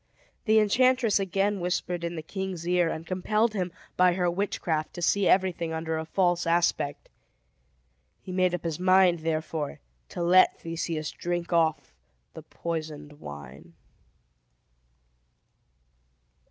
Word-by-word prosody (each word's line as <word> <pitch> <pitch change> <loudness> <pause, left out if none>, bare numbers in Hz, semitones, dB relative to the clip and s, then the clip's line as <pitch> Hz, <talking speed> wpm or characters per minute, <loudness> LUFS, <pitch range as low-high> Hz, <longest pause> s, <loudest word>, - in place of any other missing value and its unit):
The 220 -1 +4
enchantress 240 +1 +3
again 195 +1 0
whispered 175 -1 -2
in 170 0 -3
the 160 - -5
king's 185 -1 -5
ear, 175 -1 +2
and 160 0 -5
compelled 210 +5 0
him, 180 -4 -2 0.3
by 180 -1 +5
her 180 -1 0
witchcraft, 170 -4 -2
to 175 - -6
see 200 +2 +2
everything 180 -3 +1
under 160 0 -2
a 160 - -4
false 175 0 +1
aspect. 165 -4 0 1.2
He 185 - -8
made 185 -1 +2
up - - -7
his 165 -2 -3
mind, 185 -1 +4
therefore, 155 -2 -3 0.3
to 175 - -4
let 185 +2 +5
Theseus 165 -2 -4
drink 175 0 -3
off 160 -5 +1 0.4
the - - -9
poisoned 155 -3 -6
wine. 75 - -10
175 Hz, 125 wpm, -27 LUFS, 160-185 Hz, 1.2 s, by